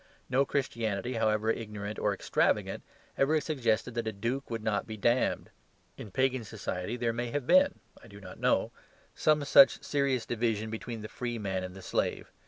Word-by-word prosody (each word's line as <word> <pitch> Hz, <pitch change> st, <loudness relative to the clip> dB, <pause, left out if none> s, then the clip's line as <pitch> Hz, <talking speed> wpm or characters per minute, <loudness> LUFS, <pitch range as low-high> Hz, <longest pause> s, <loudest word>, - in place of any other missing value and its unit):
No 135 Hz, +2 st, +3 dB
Christianity, 115 Hz, -5 st, -2 dB
however 110 Hz, -1 st, +1 dB
ignorant 105 Hz, -2 st, -5 dB
or -, -, +1 dB
extravagant, -, -, 0 dB, 0.4 s
ever 155 Hz, +3 st, +3 dB
suggested 125 Hz, -6 st, 0 dB
that 115 Hz, -1 st, -2 dB
a -, -, 0 dB
duke 115 Hz, +7 st, -3 dB
would 115 Hz, -2 st, -4 dB
not 105 Hz, -2 st, -1 dB
be 110 Hz, -1 st, -6 dB
damned. 120 Hz, +4 st, +1 dB, 0.4 s
In 105 Hz, -, -9 dB
pagan 130 Hz, +3 st, +1 dB
society 105 Hz, 0 st, -4 dB
there 115 Hz, -1 st, 0 dB
may 120 Hz, +1 st, -3 dB
have 145 Hz, +1 st, -2 dB
been 280 Hz, -, +5 dB, 0.3 s
(I -, -, -13 dB
do 100 Hz, -2 st, -12 dB
not 95 Hz, -2 st, -11 dB
know) -, -, +2 dB, 0.4 s
some 150 Hz, -2 st, +2 dB
such 140 Hz, 0 st, +7 dB
serious 140 Hz, -5 st, 0 dB
division 110 Hz, -2 st, -1 dB
between 110 Hz, 0 st, -5 dB
the -, -, -5 dB
free 120 Hz, +1 st, -4 dB
man 95 Hz, -3 st, -2 dB
and 90 Hz, 0 st, -7 dB
the 95 Hz, -, -10 dB
slave. -, -, -2 dB
115 Hz, 180 wpm, -30 LUFS, 105-130 Hz, 0.4 s, such